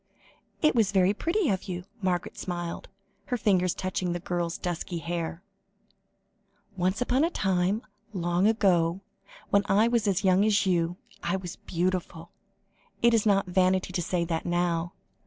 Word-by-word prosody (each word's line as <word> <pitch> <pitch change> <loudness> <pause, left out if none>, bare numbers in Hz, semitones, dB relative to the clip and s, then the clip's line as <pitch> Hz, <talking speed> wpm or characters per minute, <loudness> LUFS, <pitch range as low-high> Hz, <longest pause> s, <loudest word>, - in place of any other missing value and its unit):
"It 305 - +5
was 220 -5 +2
very 190 0 +3
pretty 335 - 0
of 190 -1 -1
you," 180 -2 -5 0.2
Margaret 180 -2 -1
smiled, 175 -2 -5 0.4
her 250 - -1
fingers 185 -5 +2
touching 185 -1 -2
the 175 - -3
girl's 175 -1 -2
dusky 175 0 -4
hair. 170 +1 -4 1.3
"Once 185 +5 0
upon 255 +3 +2
a 330 - +3
time, 195 - 0 0.3
long 175 0 +1
ago, 185 -5 +2 0.5
when 200 - +5
I 210 +3 +4
was 235 -3 +1
as 195 0 +1
young 190 +1 +4
as 215 -1 +3
you, 175 -1 +1 0.2
I 170 +2 -1
was 180 -3 -5
beautiful; 175 -1 -3 0.7
it 235 0 +6
is 225 -1 +3
not 195 -1 +3
vanity 185 0 +1
to 175 - 0
say 170 0 -1
that 165 -1 -2
now. 175 0 0
185 Hz, 155 wpm, -27 LUFS, 175-200 Hz, 1.3 s, it